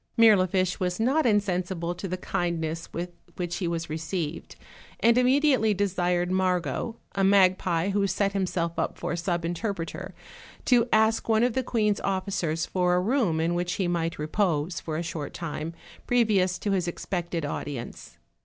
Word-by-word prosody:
Mirlifiche 185 -5 +4
was 180 0 -1
not 265 +5 +2
insensible 185 -4 0
to 185 +2 -6
the 185 0 -3
kind 175 -2 -1
ness 160 +1 -4
with 175 +1 -4 0.2
which 175 -1 -3
he 180 - -2
was 170 0 -2
received, 160 +1 -4 0.4
and 235 0 +5
immediately 250 -4 +3
desired 180 -2 0
Margot, 185 +4 0 0.2
a 195 - 0
magpie 185 -2 +3
who 200 0 +1
set 195 +1 0
himself 180 -3 -1
up - - -1
for - - -3
sub 170 0 -1
interpreter, 175 0 -4 0.5
to 240 -2 +4
ask 220 +1 +3
one 220 +1 +4
of 245 -1 +2
the 260 - +1
queen's 215 -5 +1
officers 185 -4 -1
for 180 -1 +1
a - - +3
room 200 - +1
in 165 +2 +1
which 175 0 -1
he 190 - -1
might 165 -1 -1
repose 165 0 0
for 155 -1 -4
a 170 - -2
short 160 -3 -5
time, 165 -1 -4 0.4
previous 205 -7 +3
to 205 - -2
his 185 -3 0
expected 175 -2 -3
audience. 140 -3 -6
180 Hz, 165 wpm, -27 LUFS, 170-205 Hz, 0.5 s, and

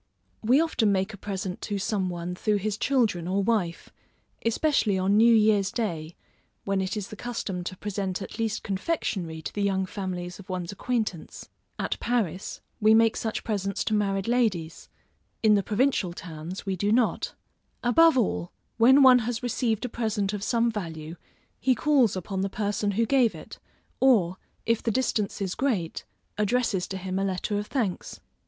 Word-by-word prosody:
We 245 +6 +4
often 285 -10 +2
make 190 +2 0
a - - -6
present 190 -2 -5
to 205 - -3
some 195 -1 -1
one 175 0 -4
through 210 +4 0
his 205 +1 -1
children 215 -9 +1
or 195 +2 +1
wife, 195 -6 -1 0.5
especially 230 -4 +2
on 190 +2 +2
new 230 +2 +6
year's 210 -3 +4
day, 170 -8 -3 0.5
when 195 -1 +1
it 190 +1 -2
is 205 -2 -4
the - - -8
custom 210 -6 -4
to 185 - -5
present 195 -2 -3
at 200 - -8
least 225 -1 -1
confectionary 190 - -2
to - - -5
the 205 - -2
young 195 -1 +1
families 185 -2 -5
of 195 0 -13
one's 180 -1 -3
acquaintance. 215 -5 -3 0.3
At - - -2
Paris, 205 -7 -2 0.2
we 215 +1 +6
make 225 0 +4
such 220 - -3
presents 200 -3 -2
to 220 - -1
married 195 -1 0
ladies; 210 -10 0 0.5
in 215 -1 +6
the 205 - +4
provincial 215 -4 +1
towns, 170 +2 -7
we 195 -1 -1
do 205 +3 0
not. 235 +1 +1 0.5
Above 320 +5 +5
all, 195 -6 0 0.3
when 260 +5 +7
one 255 -1 +8
has 240 +1 -3
received 235 -1 0
a - - -3
present 215 -4 -1
of 205 - -3
some 235 +2 +1
value, 165 -6 -6 0.4
he 260 -1 +3
calls 260 -6 +3
upon 190 +1 -3
the 195 - -1
person 205 +1 -1
who 230 +4 +2
gave 250 -2 +3
it, - - -11 0.4
or, 200 -9 +4 0.3
if 230 -1 +1
the - - -1
distance 215 -4 0
is 185 -2 -2
great, 215 -12 -1 0.3
addresses 210 -3 +1
to 190 - -5
him 190 0 -3
a - - 0
letter 195 +2 -1
of 210 - -5
thanks. 225 -10 -3
205 Hz, 175 wpm, -26 LUFS, 185-230 Hz, 0.5 s, one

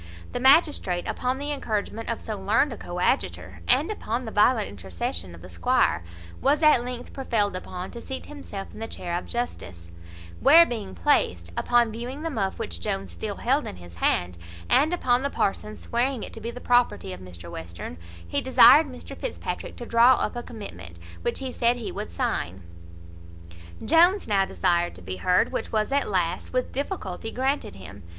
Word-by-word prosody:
The - - -3
magistrate, 265 - +4
upon 255 +1 -1
the 290 +2 -3
encouragement 225 -4 -3
of 230 - -2
so 215 - -4
learned 210 +7 +2
a - - -8
coadjutor, 180 +9 -2
and - - +3
upon 245 - -3
the 220 - -5
violent 215 +1 +3
intercession 90 -2 -5
of 85 - -14
the 90 - -10
squire, 85 0 +2 0.4
was 290 +4 +2
at 305 -6 +6
length 245 0 -6
prevailed 225 -7 0
upon 185 0 -6
to 235 - -8
seat 265 +2 -6
himself 275 -10 -8
in - - -10
the 225 - -4
chair 175 -5 -4
of 175 - -4
justice, 90 - -4 0.5
where 335 +3 +8
being 220 -9 -5
placed, 90 - +1
upon 240 -2 +3
viewing 245 +6 -6
the 330 - -2
muff 195 -8 -2
which 85 0 -5
Jones 95 +1 -3
still 85 0 -5
held - - +1
in - - -6
his 85 -1 -13
hand, 90 0 0 0.3
and 300 +4 +4
upon 255 -8 +2
the 280 - 0
parson's 210 -3 -2
swearing 245 +1 -1
it - - -8
to 225 - -9
be 230 - -4
the 240 +1 -7
property 245 - +2
of 90 - -9
Mr 85 -2 -10
Western, 85 0 -7 0.3
he 85 - -1
desired 260 +4 +7
Mr 255 -2 -9
Fitzpatrick - - -5
to 240 - -7
draw 235 +2 +6
up - - -2
a 240 - -3
commitment, 85 - -9 0.2
which - - -1
he 260 -2 -4
said 235 0 +2
he 240 -3 -5
would - - -5
sign. 85 +1 -2 1.2
Jones 345 +6 +4
now 195 -3 +3
desired 175 - 0
to 90 - -11
be 95 +1 -5
heard, 180 - +2
which - - -3
was 215 +2 0
at 280 +1 +1
last, 180 -2 -1
with 255 0 0
difficulty, 225 - -4
granted 265 - -1
him. 95 +1 -11
220 Hz, 185 wpm, -26 LUFS, -, 1.2 s, where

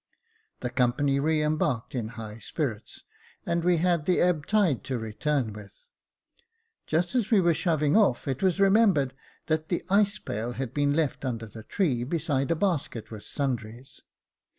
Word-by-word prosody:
The 125 - -3
company 135 +3 +1
re 155 +1 +1
embarked 150 -6 -1
in 120 -4 -2
high 110 0 -7
spirits, 120 -6 -4 0.4
and 170 0 0
we 175 0 +3
had 170 -2 +1
the 180 - +3
ebb 170 -5 +1
tide 200 - +2
to 130 - -2
return 115 +2 -1
with. 105 -1 -13 1.0
Just 170 +7 0
as 240 -5 +1
we 220 - +5
were 170 -2 +4
shoving 155 -2 +1
off, 200 - +3
it 135 -1 -2
was 190 -1 +2
remembered 195 - +4 0.3
that 155 0 -1
the 175 - -1
ice 200 +1 +3
pail 115 - -4
had 130 -2 -4
been 145 0 +1
left 155 -4 0
under 115 -4 -3
the 110 +1 -10
tree, 125 - 0
besides 145 -1 -1
a - - +3
basket 155 - -2
with 110 -2 -8
sundries. 125 -3 -4
145 Hz, 165 wpm, -27 LUFS, 120-175 Hz, 1.0 s, we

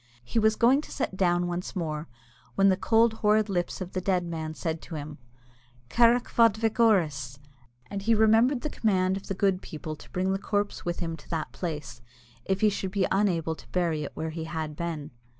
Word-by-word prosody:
He 225 - 0
was 220 0 +3
going 250 +6 +4
to - - -12
sit 230 - -3
down 175 -2 +2
once 175 +2 -4
more, 160 -3 -3 0.5
when 195 0 +5
the 190 - +4
cold, 225 +4 +3
horrid 215 0 +3
lips 180 0 -2
of 185 0 -5
the 185 - -1
dead 185 -1 +1
man 160 -2 -4
said 160 -1 -3
to 165 - -8
him, 150 0 -7 0.7
"Carrick 240 - +5
fhad 230 -3 +3
vic 225 +1 -1
Orus," 155 - +2 0.5
and 200 - -5
he 225 +3 +3
remembered 225 +4 +4
the 300 - -3
command 190 -4 +1
of 195 - -7
the 195 - -3
good 190 -1 +1
people 155 0 -6
to - - -15
bring 185 +1 -1
the 195 - -1
corpse 205 0 -2
with 175 0 -3
him 165 -1 -2
to 150 - -18
that 160 -2 -3
place 150 -8 -5 0.4
if 190 0 -1
he 215 - +5
should 195 -1 -3
be 190 0 +1
unable 180 -5 +1
to - - -13
bury 170 -4 0
it 140 - -7
where 160 0 -3
he 160 0 -5
had 155 -2 -4
been. 160 -3 -4
185 Hz, 210 wpm, -27 LUFS, 160-210 Hz, 0.7 s, when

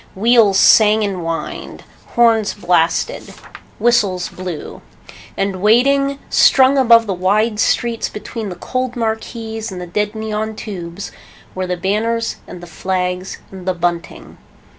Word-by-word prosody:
Wheels 215 -2 +4
sang 215 0 +5
and 200 -2 -2
whined. 165 -1 -5 0.3
Horns 225 -3 +3
blasted. 175 -4 0 0.4
Whistles 205 -6 +1
blew. 180 -4 -7 0.6
And 195 -1 -1
waiting, 275 +6 +3
strung 265 +1 +5
above 230 -3 +6
the 200 - -2
wide 210 +4 +1
streets 235 0 0
between 215 0 -6
the 180 - -6
cold 255 +7 -3
marquees 225 -1 -4
and 185 - -7
the 180 - -6
dead 210 +4 -2
neon 220 0 -3
tubes, 190 -3 -7 0.4
were 185 0 -3
the 180 0 -2
banners 225 +5 -1
and 180 - -10
the - - -9
flags 180 +2 -3
and 190 -1 -10
the 185 - 0
bunting. 170 0 -4
210 Hz, 135 wpm, -17 LUFS, 185-230 Hz, 0.6 s, above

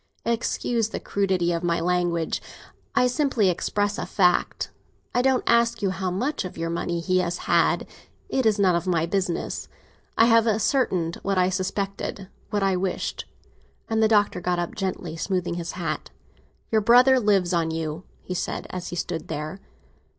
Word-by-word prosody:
Excuse 230 -1 0
the - - -4
crudity 185 -3 0
of 170 0 -2
my 170 -1 +1
language; 175 -2 0 0.5
I - - +4
simply 250 -6 +2
express 205 +3 -1
a - - -3
fact. 180 -3 +1 0.4
I 245 - +3
don't 260 0 +2
ask 235 -1 +3
you 195 - +2
how 185 0 -2
much 250 +12 -1
of 185 - -7
your 165 0 -2
money 170 0 -2
he 185 +2 +2
has 175 -1 -1
had, - - +3 0.4
it 260 -4 +1
is 215 -1 +3
none 190 -3 +4
of 170 +2 -2
my 165 -3 +2
business. 180 -1 -2 0.5
I 225 - +7
have 230 -1 +5
ascertained 210 - +1
what 195 -1 -2
I 180 0 +4
suspected—what 195 +1 -3
I 195 -1 +2
wished." 185 0 -2 0.7
And 220 0 +2
the 220 - +5
Doctor 205 -4 +2
got 180 0 0
up, 175 -1 -2
gently 185 -4 -3
smoothing 180 0 -1
his 170 0 -4
hat. 165 -4 -3 0.6
"Your 220 -1 +3
brother 250 +4 +6
lives 195 -5 +2
on 165 -2 +1
you," 160 +1 -4 0.2
he 185 - -5
said 180 - -3
as 180 -1 -5
he - - -5
stood 170 -1 -3
there. 155 +4 -5
185 Hz, 170 wpm, -25 LUFS, 175-215 Hz, 0.7 s, I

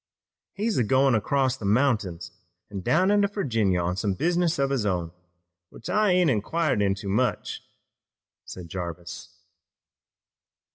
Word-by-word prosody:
"He's 210 - -1
goin' 130 +4 +3
across 130 +4 +1
the 105 - -7
mountains 105 -6 0 0.4
an' 100 - -4
down 185 - +2
into 205 -1 +3
Virginia 115 - 0
on 90 +2 -2
some 100 -2 -1
business 175 - +1
of 140 0 0
his 135 -5 0
own 90 -5 -1 0.6
which - - -8
I 210 +2 +3
ain't 180 -4 +3
inquired 135 +3 0
into 100 0 -1
much," 120 +6 -1 0.8
said 90 -2 -9
Jarvis. 85 -1 -7
115 Hz, 130 wpm, -25 LUFS, 95-160 Hz, 0.8 s, goin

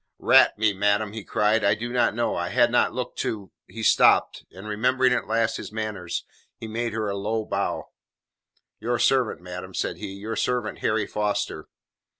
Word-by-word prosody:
"Rat - - +5
me, 105 -1 +2
madam," 105 +1 +1
he 110 -2 -6
cried, 105 +3 +1
"I - - +4
did 120 +3 -5
not 120 -4 +2
know 120 0 0
I 85 0 -2
had 120 +4 +3
not 120 - +3
looked 125 0 -5
to 100 -3 -3
" - - -67
He 115 - -8
stopped, - - +4
and 95 +3 -11
remembering 125 +4 +2
at - - -1
last 115 0 +1
his - - -8
manners 105 -5 -4 0.3
he 110 - -7
made 115 +1 -3
her 110 -1 -2
a 100 - -2
low 110 +2 -2
bow. - - -2 1.0
"Your 120 +2 -1
servant, 130 -8 +2
madam," 90 +1 -8
said - - -2
he, 95 - -6
"your 105 +3 -5
servant 125 +2 -1
Harry 110 -1 0
Foster." 105 -1 -2
110 Hz, 185 wpm, -25 LUFS, 105-120 Hz, 1.0 s, Rat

